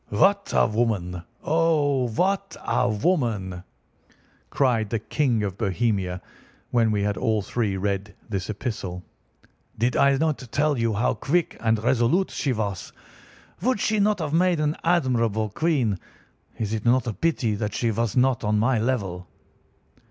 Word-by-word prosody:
"What 200 - +2
a - - +5
woman—oh, 120 - 0
what 195 - -1
a 125 - +1
woman!" 105 - 0 0.9
cried 120 -6 +1
the 115 - 0
King 115 0 0
of 100 -1 -4
Bohemia, 100 -4 -1 0.5
when 115 -2 +3
we 105 -2 0
had 105 0 -1
all 110 -2 0
three 105 -3 -1
read 100 0 -2
this 100 -3 -3
epistle. 100 -5 -4 0.7
"Did 120 +3 +1
I 140 0 +4
not 155 0 0
tell 150 +1 +2
you 115 -2 0
how 110 +4 +1
quick 170 +3 0
and 110 -1 +2
resolute 130 +9 +2
she 140 - -1
was? 100 -6 -3 0.7
Would 255 -3 +1
she 215 +1 +1
not 205 +1 +3
have 155 -4 -3
made 175 0 +3
an 150 +1 +1
admirable 120 - +1
queen? 125 - 0 0.6
Is 110 -1 -2
it 110 -1 -2
not 125 +2 +3
a 115 - -2
pity 130 -6 0
that 105 0 -3
she 115 -2 +1
was 115 0 -1
not 125 -1 +3
on 105 0 +1
my 115 +2 +2
level?" 100 -7 -2
115 Hz, 150 wpm, -24 LUFS, 105-145 Hz, 0.9 s, a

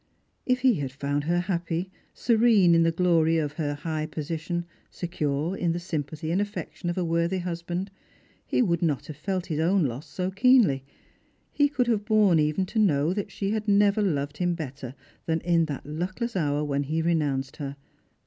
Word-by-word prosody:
If 255 -1 +2
he 260 -1 +5
had 135 -2 -3
found 145 +1 -2
her 175 +2 +1
happy, 175 0 -2 0.2
serene 220 -6 +4
in 165 - +5
the 165 0 +3
glory 165 -2 +3
of 150 -3 -1
her 150 -2 -2
high 155 +1 -3
position, 165 +3 -4 0.2
secure 155 0 -2
in 170 -3 0
the 175 - -2
sympathy 155 -2 -4
and 185 +4 +2
affection 205 -3 -4
of 175 - -3
a 180 - 0
worthy 170 +2 +1
hus 175 -2 -4
band, 175 +3 -4 0.5
he - - +1
would 170 -6 0
not 155 -6 0
have 155 - -8
felt 185 +4 -3
his 155 -4 -3
own 175 +1 +3
loss 130 +3 -4
so 185 0 -3
keenly; 200 - +4 0.7
he 290 0 +3
could 270 -4 +1
have 225 -4 +1
borne 210 -6 +4
even 155 +5 +1
to 220 +4 -2
know 160 -5 +3
that 205 0 -3
she 195 0 -2
had 215 0 -2
never 205 +1 +4
loved 145 -6 -1
him 175 0 0
better 135 -5 -7 0.3
tlnin 160 0 +1
in 170 -1 +3
that 145 -4 -6
luckless 185 - -4
hour 150 -4 0
when 140 -1 0
he 160 +3 -1
renounced 145 -5 0
her. 140 -2 -5
170 Hz, 190 wpm, -26 LUFS, 150-190 Hz, 0.7 s, he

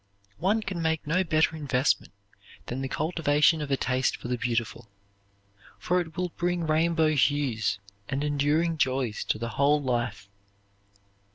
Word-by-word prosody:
One 205 +6 +1
can 185 -4 -4
make 160 -1 0
no 165 +5 +2
better 160 -1 +2
investment 140 -3 0 0.5
than 125 +2 -4
the 135 - -2
cultivation 155 +1 +2
of 145 - -4
a 135 - +2
taste 130 0 0
for 120 - -8
the 125 - +1
beautiful, 120 -1 -2 0.9
for 180 +1 +1
it 160 -2 -9
will 180 0 -1
bring 175 0 -1
rainbow 160 0 +2
hues 140 -8 +1 0.3
and 135 +2 -1
enduring 150 +3 +1
joys 130 -5 0
to - - 0
the 115 +1 -4
whole 140 +6 +3
life. 120 -6 -2
145 Hz, 150 wpm, -27 LUFS, 130-165 Hz, 0.9 s, whole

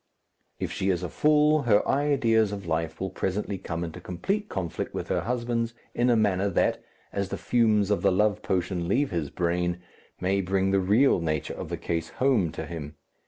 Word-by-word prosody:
If - - -3
she 95 - -1
is 90 -2 0
a 90 - -3
fool, 150 0 +3
her 105 -1 +4
ideas 125 -7 +2
of 100 -2 -6
life 80 -1 -2
will 95 0 -3
presently 95 0 -2
come 85 -2 -4
into 85 +1 -6
complete 195 - -2
conflict 90 -4 -4
with - - -4
her - - +1
husband's 120 0 -2 0.2
in 120 +1 +2
a 120 - +5
manner 100 -3 +2
that, 90 - +1 0.3
as 100 -1 -2
the - - -3
fumes 110 -4 +2
of 105 - +1
the 100 - +4
love 105 +2 +2
potion 90 -1 -1
leave 130 +8 +1
his 80 -5 -2
brain, 90 +1 -1 0.4
may 95 +2 +1
bring 95 +1 +1
the 100 - +3
real 105 +6 +4
nature 80 -3 -2
of - - -7
the - - -3
case 85 -1 -3
home 125 - +2
to - - -5
him. 75 -3 -7
95 Hz, 195 wpm, -27 LUFS, 90-115 Hz, 0.4 s, a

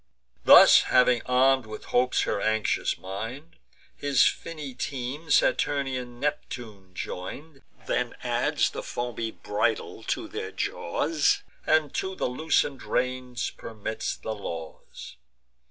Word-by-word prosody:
Thus - - +9
having 125 -2 +4
arm'd 130 -1 +3
with 110 0 -8
hopes 125 +1 +3
her 100 - -1
anxious 110 -1 0
mind, 115 - -7 0.4
His 140 -3 +3
finny 155 -5 -3
team 135 +4 -5
Saturnian 130 -5 +1
Neptune 115 -9 -5
join'd, 135 - -7 0.2
Then - - -1
adds - - +1
the - - -5
foamy 120 -2 -4
bridle 105 -1 -2
to - - -2
their - - -5
jaws, 150 - 0 0.2
And 155 -2 +3
to 190 0 -2
the - - -2
loosen'd 140 +1 0
reins 125 -1 -2
permits 110 0 -5
the 110 - -4
laws. 85 - -8
125 Hz, 115 wpm, -27 LUFS, 110-140 Hz, 0.4 s, Thus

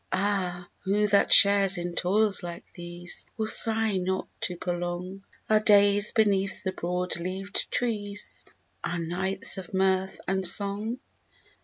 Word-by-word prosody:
Ah, 185 -3 -1
who 205 +2 0
that 200 -1 +2
shares 200 -1 +7
in 175 0 -5
toils 200 +3 0
like 170 -1 -8
these 175 0 -9
Will 220 - -1
sigh 220 -1 +3
not 185 +1 -3
to 180 - -3
prolong 175 +2 -5 0.2
Our 215 0 +3
days 205 -1 +4
beneath 200 -3 0
the 190 - -2
broad 180 0 -3
leaved 190 +3 -4
trees, 205 -4 -4 0.4
Our 170 - -2
nights 190 +4 -1
of 190 0 -9
mirth 190 0 0
and 190 0 -1
song? 205 +5 -1
190 Hz, 135 wpm, -26 LUFS, 180-205 Hz, 0.4 s, shares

